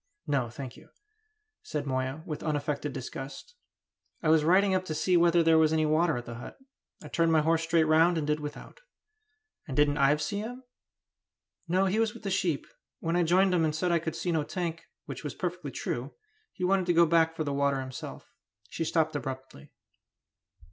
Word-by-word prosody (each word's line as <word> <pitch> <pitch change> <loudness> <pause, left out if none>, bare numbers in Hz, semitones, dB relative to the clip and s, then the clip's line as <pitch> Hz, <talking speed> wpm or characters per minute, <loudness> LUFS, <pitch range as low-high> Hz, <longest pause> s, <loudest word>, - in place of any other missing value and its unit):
"No, 135 -5 0
thank 130 +1 -8
you," - - -17 0.7
said 150 -2 -4
Moya, 130 +3 -2
with 155 -5 -5
unaffected 150 -1 -2
disgust. 135 - -7 0.7
"I 160 - +2
was 155 -1 +5
riding 190 +4 +4
up 185 0 +1
to 155 - -4
see 180 +4 +2
whether 170 0 +5
there 160 0 +5
was 155 -1 +4
any 160 -1 +2
water 155 0 +2
at 120 - -6
the 120 - -7
hut. - - -9 0.5
I - - -8
turned 165 +2 +1
my 160 -1 +4
horse 165 +1 +2
straight 165 0 +3
round, 160 +2 +4
and 155 - -1
did 150 +1 0
without." 150 - -8 0.9
"And 135 - -5
didn't 145 0 +3
Ives 150 +2 +3
see 205 -1 -2
him?" 245 +4 -6 1.0
"No, 185 +3 +2
he 195 +3 +1
was 225 0 +1
with 230 - -12
the 195 - -2
sheep; 170 -5 0 0.3
when 165 0 -1
I 175 - +3
joined 180 +3 +3
him 170 -2 +3
and 155 -1 0
said 175 +2 0
I 170 - +3
could 160 0 -4
see 180 - -2
no 160 -2 +1
tank, 165 0 -4 0.2
which - - -7
was - - -5
perfectly - - -4
true, - - -4 0.4
he - - -7
wanted 185 0 +2
to 175 - +3
go 170 0 +6
back 165 0 +3
for 160 - -2
the 145 -2 -2
water 140 -1 +1
himself." 130 -1 -7 0.4
She 165 - -3
stopped 160 -1 +1
abruptly. 130 - -6
160 Hz, 200 wpm, -29 LUFS, 145-175 Hz, 1.0 s, go